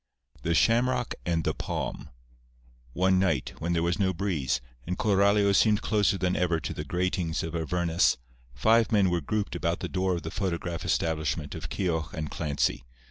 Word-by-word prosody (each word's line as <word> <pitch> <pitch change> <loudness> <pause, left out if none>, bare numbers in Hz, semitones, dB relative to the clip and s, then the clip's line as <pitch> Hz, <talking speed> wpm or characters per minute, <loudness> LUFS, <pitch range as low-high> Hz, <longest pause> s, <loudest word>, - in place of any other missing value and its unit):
X - - -25
THE 85 - 0
SHAMROCK 125 +3 +2
AND 85 -2 +1
THE - - 0
PALM - - -4 0.8
One 95 +1 +3
night 85 -9 0
when 85 +2 -1
there 85 -1 +1
was 85 +2 0
no 95 -2 +1
breeze, 85 -8 -1 0.3
and 90 +1 -2
Coralio 100 0 +3
seemed 105 +1 +3
closer 105 -2 +2
than 90 0 0
ever 85 -2 +1
to - - -4
the - - -5
gratings 90 -2 -1
of 80 0 -4
Avernus, 85 +1 +1 0.4
five 115 +1 +3
men 100 -4 +4
were 85 -1 0
grouped 105 +4 -2
about 85 0 -1
the - - -2
door 95 -1 0
of 85 - -5
the 80 - -5
photograph 85 -3 -3
establishment 80 -2 -1
of - - -6
Keogh 80 -4 -1
and 80 -1 -4
Clancy. 75 -5 -1
90 Hz, 180 wpm, -28 LUFS, 80-100 Hz, 0.8 s, men